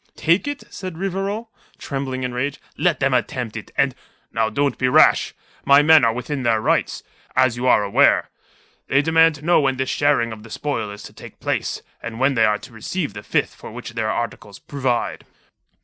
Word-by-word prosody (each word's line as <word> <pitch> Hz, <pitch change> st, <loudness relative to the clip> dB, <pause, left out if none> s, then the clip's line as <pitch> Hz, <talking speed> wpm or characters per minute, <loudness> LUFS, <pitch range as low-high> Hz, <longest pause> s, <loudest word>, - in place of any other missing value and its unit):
"Take 170 Hz, -, +2 dB
it?" 290 Hz, -1 st, -4 dB
said 185 Hz, -4 st, -6 dB
Rivarol, 195 Hz, +4 st, -3 dB, 0.3 s
trembling 135 Hz, -2 st, -4 dB
in 125 Hz, -, -2 dB
his -, -, -8 dB
rage. 140 Hz, +3 st, -2 dB
"Let 175 Hz, -3 st, +1 dB
them 135 Hz, -1 st, +1 dB
attempt 125 Hz, -2 st, -1 dB
it, -, -, -7 dB
and...." -, -, +2 dB, 0.4 s
"Now 110 Hz, -1 st, 0 dB
don't 140 Hz, +5 st, -1 dB
be 130 Hz, -, +2 dB
rash. 125 Hz, -, +4 dB, 0.3 s
My 140 Hz, +1 st, +6 dB
men 160 Hz, -2 st, +7 dB
are 115 Hz, -, +4 dB
within 130 Hz, +4 st, -4 dB
their 115 Hz, -3 st, +2 dB
rights, -, -, 0 dB, 0.3 s
as 130 Hz, -2 st, +3 dB
you 125 Hz, +1 st, -2 dB
are 105 Hz, -, +5 dB
aware. 100 Hz, -, +3 dB, 0.6 s
They 140 Hz, +2 st, +3 dB
demand 160 Hz, 0 st, +4 dB
to 150 Hz, +1 st, -12 dB
know 175 Hz, 0 st, +5 dB
when 135 Hz, -2 st, 0 dB
this 130 Hz, 0 st, -1 dB
sharing 145 Hz, -5 st, +2 dB
of 110 Hz, -1 st, -8 dB
the 115 Hz, -, -13 dB
spoil 115 Hz, -7 st, -3 dB
is 105 Hz, 0 st, -9 dB
to -, -, -11 dB
take -, -, -13 dB
place, -, -, -2 dB, 0.2 s
and 115 Hz, 0 st, -6 dB
when 135 Hz, +2 st, +3 dB
they 115 Hz, -3 st, +3 dB
are 105 Hz, -1 st, +2 dB
to 120 Hz, -, -14 dB
receive 125 Hz, -, -4 dB
the 100 Hz, -, -7 dB
fifth -, -, -1 dB
for -, -, -11 dB
which 120 Hz, +1 st, -8 dB
their 110 Hz, -2 st, -1 dB
articles 105 Hz, -3 st, -4 dB
provide." 130 Hz, -4 st, -2 dB
130 Hz, 205 wpm, -21 LUFS, 115-150 Hz, 0.6 s, men